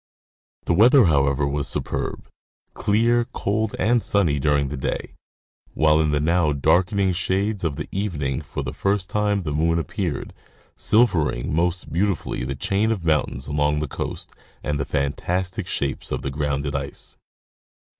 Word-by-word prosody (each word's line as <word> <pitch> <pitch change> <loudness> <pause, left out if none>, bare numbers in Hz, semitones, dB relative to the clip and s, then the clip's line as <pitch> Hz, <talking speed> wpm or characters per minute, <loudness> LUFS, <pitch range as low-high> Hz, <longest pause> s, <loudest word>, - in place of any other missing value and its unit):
The - - +2
weather, 120 - +6
however, 70 -3 +2
was 70 0 -1
superb, - - -3 0.5
clear, 115 +3 +2
cold, 110 +2 -1
and 120 +1 +2
sunny, 85 -11 +2
during 70 -1 +1
the 75 - -4
day, 65 - -3 0.6
while 75 0 +4
in 75 - +1
the 75 0 +1
now 80 0 +2
darkening 95 +6 +2
shades 95 +3 -1
of 80 -4 -1
the - - -5
evening 75 -9 -2
for 75 - -5
the - - -5
first 100 -2 -1
time 105 -2 +1
the 75 -3 -3
moon 80 +2 +2
appeared, 85 -1 -3 0.4
silvering 90 - +2
most 90 +2 0
beautifully 95 0 -1
the 70 - -3
chain 100 +7 +1
of 95 -7 -3
mountains 75 -4 0
along 75 0 +1
the 75 0 -1
coast - - -5 0.3
and 75 -1 -1
the 70 - -1
fantastic 90 +6 -2
shapes 70 -1 -3
of - - -2
the 70 - -2
grounded 70 0 -2
ice. 70 0 -5
80 Hz, 155 wpm, -23 LUFS, 75-100 Hz, 0.6 s, weather